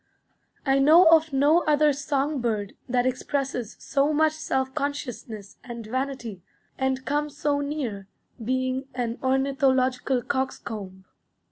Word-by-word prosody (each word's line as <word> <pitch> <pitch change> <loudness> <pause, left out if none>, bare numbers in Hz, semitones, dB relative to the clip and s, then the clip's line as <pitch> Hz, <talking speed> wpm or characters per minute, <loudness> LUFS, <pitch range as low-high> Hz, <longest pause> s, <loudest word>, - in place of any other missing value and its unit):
I 270 -1 +3
know 310 +6 +7
of 320 -1 0
no 290 +5 +4
other 300 -1 +4
song 285 0 -1
bird 215 -4 -2 0.2
that 245 0 +2
expresses 255 -2 -2
so 280 +1 +1
much 310 +1 +3
self 265 -4 -2
consciousness 245 -8 -5
and 235 -2 -7
vanity, 240 -4 -4 0.3
and 265 0 -1
comes 295 0 -1
so 290 -1 +1
near 270 -9 -4 0.4
being 260 +2 -1
an 240 -1 -2
ornithological 260 -1 +1
coxcomb. 205 -7 -4
265 Hz, 120 wpm, -25 LUFS, 245-285 Hz, 0.4 s, know